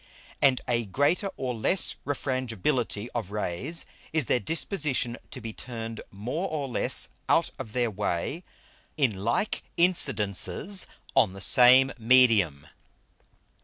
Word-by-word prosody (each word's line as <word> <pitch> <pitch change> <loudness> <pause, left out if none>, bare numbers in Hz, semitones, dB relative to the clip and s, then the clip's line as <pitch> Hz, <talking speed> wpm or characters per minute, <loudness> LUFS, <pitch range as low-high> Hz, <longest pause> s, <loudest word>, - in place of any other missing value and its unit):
And 135 -3 +4
a 120 -1 0
greater 145 - 0
or 130 -2 -3
less 120 - +1
Refrangibility 125 -5 -1
of 115 -6 -4
Rays, 105 - -3 0.3
is 155 -4 +1
their 125 - +1
Disposition 145 - 0
to - - -8
be 115 -2 -7
turned 115 -2 -7
more 125 - -4
or 145 -3 -3
less 125 - -1 0.2
out - - +3
of 110 - -8
their 120 -2 0
Way 105 - -3 0.5
in 110 -10 0
like 120 - 0 0.2
Incidences 170 - +2 0.3
on 100 -5 +4
the 95 - -9
same 130 +5 +6
Medium. 110 - +3
125 Hz, 125 wpm, -27 LUFS, 105-145 Hz, 0.5 s, same